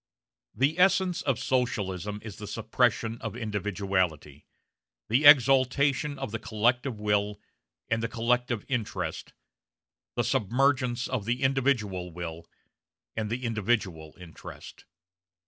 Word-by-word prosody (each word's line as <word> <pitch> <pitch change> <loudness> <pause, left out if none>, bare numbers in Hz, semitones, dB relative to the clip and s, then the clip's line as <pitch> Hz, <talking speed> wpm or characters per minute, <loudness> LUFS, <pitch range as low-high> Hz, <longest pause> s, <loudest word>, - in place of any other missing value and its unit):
The 140 +9 +1
essence 185 -1 +3
of 135 -5 0
Socialism 105 -6 -1
is 110 -4 -8
the 105 - -7
suppression 115 +1 0
of - - -5
individuality, 95 - -2 0.6
the 130 +7 +3
exaltation 140 +1 +5
of 135 -5 -5
the 115 - -3
collective 120 +2 0
will 105 0 0 0.5
and 115 0 0
the 115 - -1
collective 120 0 0
interest, 100 - -3 0.8
the - - +1
submergence 125 +2 +1
of 125 -6 -3
the 120 +4 -1
individual 120 -10 0
will 85 -1 -7 0.7
and 110 -1 -2
the 120 +3 -3
individual 105 -8 -1
interest. 85 -3 -11
115 Hz, 110 wpm, -28 LUFS, 100-130 Hz, 0.8 s, exaltation